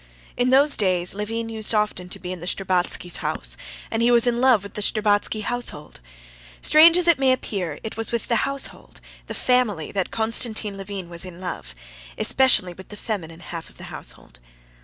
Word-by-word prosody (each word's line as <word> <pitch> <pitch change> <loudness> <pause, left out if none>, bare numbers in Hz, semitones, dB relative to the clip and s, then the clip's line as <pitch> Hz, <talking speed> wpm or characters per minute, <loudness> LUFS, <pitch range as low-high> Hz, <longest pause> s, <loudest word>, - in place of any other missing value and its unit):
In 245 +1 +1
those 280 +3 +5
days 180 -3 +1
Levin 225 +3 -3
used 220 0 +2
often 210 -4 -1
to - - -3
be 180 -1 -7
in 185 - -8
the 175 - -8
Shtcherbatskys' 180 -2 0
house, - - -2 0.4
and 225 - -1
he 235 - +4
was 240 -1 +4
in 240 0 +1
love 255 -6 +4
with 200 - -10
the 210 - -5
Shtcherbatsky 210 0 +1
household. 245 - -4 0.6
Strange 330 +3 +7
as 355 -1 +2
it 340 -5 +5
may 265 -1 +4
appear, 190 - -2
it 220 - -6
was 225 - 0
with 235 -2 -2
the 235 - +2
household, 275 +4 -3 0.3
the - - -5
family, 230 -11 +1
that 195 -2 -2
Konstantin 220 -2 0
Levin 195 -2 -6
was 170 0 -3
in 180 -2 -9
love, 65 - -6 0.4
especially 215 -9 +3
with 190 +2 -13
the 210 - -10
feminine 175 -7 -5
half 170 -2 -8
of - - -21
the - - -10
household. - - -8
210 Hz, 190 wpm, -23 LUFS, 180-240 Hz, 0.6 s, Strange